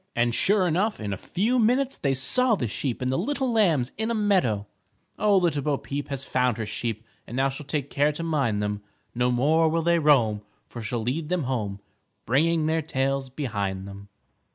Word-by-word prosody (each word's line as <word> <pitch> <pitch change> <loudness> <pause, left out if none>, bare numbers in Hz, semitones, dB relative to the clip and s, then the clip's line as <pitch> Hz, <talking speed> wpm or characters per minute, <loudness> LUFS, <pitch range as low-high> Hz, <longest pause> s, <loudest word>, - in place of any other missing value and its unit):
And 120 0 +2
sure 195 - +2
enough, 190 +7 0
in 105 -2 -3
a - - -2
few 220 - 0
minutes 255 +4 +2
they 135 -2 0
saw 235 - +3
the 125 - -2
sheep 125 +3 -3
and 130 - 0
the 130 - 0
little 265 +5 -1
lambs 165 - +2
in 220 +1 -1
a 235 - 0
meadow. 185 - +1 0.5
_Oh, 205 -2 +4
Little 165 -5 +1
Bo 145 0 0
Peep 145 +1 -5
Has 140 -1 -4
found 125 -3 +1
her 110 - -3
sheep 110 +1 -4 0.2
And 120 - -6
now 135 +1 +2
she'll 135 +1 -8
take 140 -2 -3
care 145 +2 +2
to 165 - -5
mind 135 -11 0
them. 105 0 -2 0.3
No 125 +1 +1
more 155 +6 +3
will 165 +1 0
they 170 0 +3
roam, 120 -9 +3 0.3
For 120 - -8
she'll 110 +1 -3
lead 150 +6 -2
them 180 -3 0
home 105 -6 -3 0.4
Bringing 155 +6 +2
their 160 +1 +1
tails 135 -2 -1
behind 100 -8 -3
them. 100 0 -11
140 Hz, 200 wpm, -25 LUFS, 120-170 Hz, 0.5 s, Oh